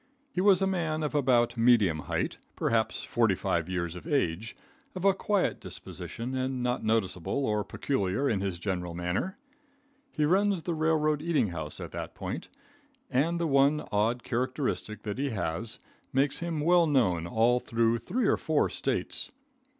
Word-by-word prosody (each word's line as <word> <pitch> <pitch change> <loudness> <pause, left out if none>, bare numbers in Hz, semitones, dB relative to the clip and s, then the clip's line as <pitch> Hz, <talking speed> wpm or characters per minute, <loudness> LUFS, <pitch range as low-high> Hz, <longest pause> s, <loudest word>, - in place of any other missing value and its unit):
He 180 - -1
was 195 -1 +5
a - - +4
man 160 -5 -1
of 150 - -2
about 125 -4 +3
medium 115 -9 +4
height, - - -2 0.2
perhaps 115 -1 0
45 95 -6 +1
years 85 -2 -2
of 90 - -9
age, 115 - 0 0.4
of 185 +1 -3
a 195 - +6
quiet 200 0 0
disposition, 120 +3 -6
and 130 -1 -1
not 125 0 0
noticeable 110 +3 0
or 105 -2 +1
peculiar 100 +2 -1
in 105 -7 +1
his 95 -3 -2
general 90 -2 -3
manner. 90 - -2 0.8
He 150 - +3
runs 190 +1 +2
the 175 - -1
railroad 155 -2 +2
eating 160 - +1
house 80 -3 -6
at - - -6
that - - -6
point, - - -5 0.6
and 165 +7 +1
the 170 - 0
one 140 +1 +3
odd 115 +4 +1
characteristic 130 -3 -2
which 105 +3 -3
he 140 0 0
has, 110 +1 -2 0.3
makes 140 +2 +1
him 170 -3 -2
well 170 +1 +5
known 95 - +2
all 115 +6 +3
through 115 -1 +1
three 240 - -1
or - - +3
four - - +1
States. - - -2
125 Hz, 160 wpm, -29 LUFS, 105-155 Hz, 0.8 s, a